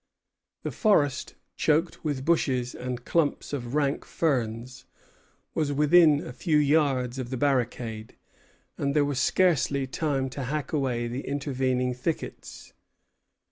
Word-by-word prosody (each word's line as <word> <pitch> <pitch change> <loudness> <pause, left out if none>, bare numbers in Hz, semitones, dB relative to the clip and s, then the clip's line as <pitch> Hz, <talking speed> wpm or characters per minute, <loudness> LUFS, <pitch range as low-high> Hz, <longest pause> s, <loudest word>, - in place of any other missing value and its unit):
The - - -3
forest, 145 - +1 0.2
choked 160 +3 +1
with 145 -4 -2
bushes 130 -7 +1
and 125 -1 -5
clumps 155 -3 0
of 125 -1 -4
rank 140 -2 +1
ferns, 125 -4 -2 0.7
was 150 -3 0
within 150 +1 +5
a 125 - -7
few 155 +4 +1
yards 140 -4 +2
of 125 -2 -4
the 130 - -3
barricade, 120 -5 -1 0.6
and 140 0 0
there 145 -1 +4
was 140 -3 -1
scarcely 145 -7 +2
time 135 0 -1
to 135 0 -5
hack 150 +2 -3
away 125 -5 0
the 125 +3 -4
intervening 130 -3 -1
thickets. 130 +6 -5
140 Hz, 130 wpm, -27 LUFS, 125-150 Hz, 0.7 s, within